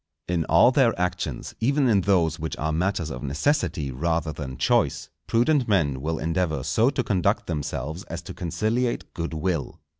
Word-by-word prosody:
In 85 -3 0
all 100 +11 +5
their 125 -7 +3
actions, 90 0 -2
even 140 +4 +2
in 105 -5 +4
those 85 -4 +2
which 80 0 -4
are 80 0 -1
matters 85 0 -1
of - - -6
necessity 75 - 0
rather 80 +3 -1
than 70 -4 -6
choice, - - +1 0.2
prudent 125 +3 +2
men 75 -11 +1
will 80 +2 -2
endeavour 80 -3 -1
so 95 - +3
to 135 -2 -1
conduct 95 -5 +1
themselves 75 0 -4
as 85 +1 -6
to - - -8
conciliate 110 +8 -1
good 85 -1 -4
will. 80 -1 -2
85 Hz, 170 wpm, -25 LUFS, 80-110 Hz, 0.2 s, all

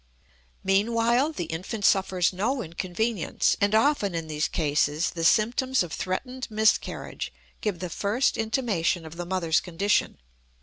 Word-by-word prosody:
Meanwhile 230 +8 +2
the 175 - -3
infant 185 +6 -4
suffers 190 -2 +3
no 235 +7 -1
inconvenience, 185 +4 -1
and 200 +1 +3
often 220 - +2
in 165 -1 -2
these 155 -1 -1
cases 150 0 0
the 165 - -5
symptoms 240 +7 +3
of 170 - -7
threatened 250 +8 -3
miscarriage 220 0 0 0.3
give 210 -4 -1
the 180 - -4
first 220 +7 +1
intimation 220 -7 0
of 160 +1 -9
the 175 0 -5
mother's 175 -3 +1
condition. 195 +4 0
195 Hz, 135 wpm, -26 LUFS, 170-230 Hz, 0.3 s, suffers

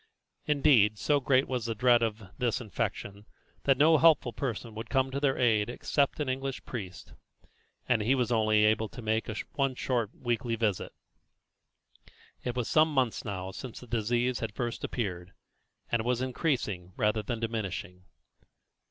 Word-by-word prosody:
Indeed, 135 -8 +4
so 145 +7 +2
great 130 0 +2
was 125 -3 -2
the 115 - -2
dread 120 +1 +4
of 110 -1 -1 0.2
this 120 -3 +1
infection, 105 -1 -4 0.4
that 135 -2 +4
no 155 +2 +5
helpful 150 -7 +4
person 120 -3 -4
would 110 +1 -7
come 135 -1 +1
to 140 - -2
their 140 -2 +1
aid 110 -3 +2
except 140 +4 0
an 150 - -1
English 135 +1 -3
priest, 95 -7 -7 0.7
and 120 -4 +2
he 120 +6 +2
was 125 -2 0
able 115 - +3
only 110 0 +4
to 110 +3 -6
make 110 +1 0
a 110 - -4 0.4
short 120 -4 -1
weekly 120 -1 -1
visit. 110 -4 -1 1.5
It 125 -1 -3
was 125 -2 -1
some 155 0 +4
months 130 -5 0
now 95 -3 -4
since 125 +4 -8
the - - -11
disease 120 +2 0
had 110 -2 -4
first 120 -2 -3
appeared, 95 -5 -4 0.6
and 115 - +2
it - - -2
was 125 -1 +1
increasing 120 - -2
rather 105 +1 +1
than 115 +2 -4
diminishing. 100 -5 -4
120 Hz, 160 wpm, -29 LUFS, 110-130 Hz, 1.5 s, no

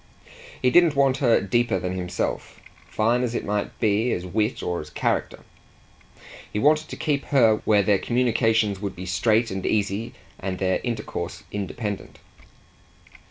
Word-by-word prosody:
He 125 - +2
didn't 170 0 +5
want 135 -1 +3
her 120 -4 +4
deeper 120 0 +1
than 90 0 -3
himself, 90 -1 -3 0.3
fine 115 +3 +1
as 120 -1 -2
it - - -2
might 105 0 -3
be 110 +2 +2
as 90 - -3
wit 105 +5 -1
or 90 -1 -2
as 75 - -10
character; - - -2 1.1
he - - -3
wanted 155 +6 +3
to - - -6
keep 145 -2 -1
her 115 -6 +4
where 105 -2 +4
their 100 -1 +3
communications 115 -4 +1
would 100 -1 -4
be 90 - -7
straight 110 +5 +1
and 95 0 -4
easy 105 +1 -1 0.2
and 95 -1 -3
their 95 0 0
intercourse 90 -7 -4
independent. 105 +1 -5
110 Hz, 155 wpm, -24 LUFS, 95-120 Hz, 1.1 s, didn't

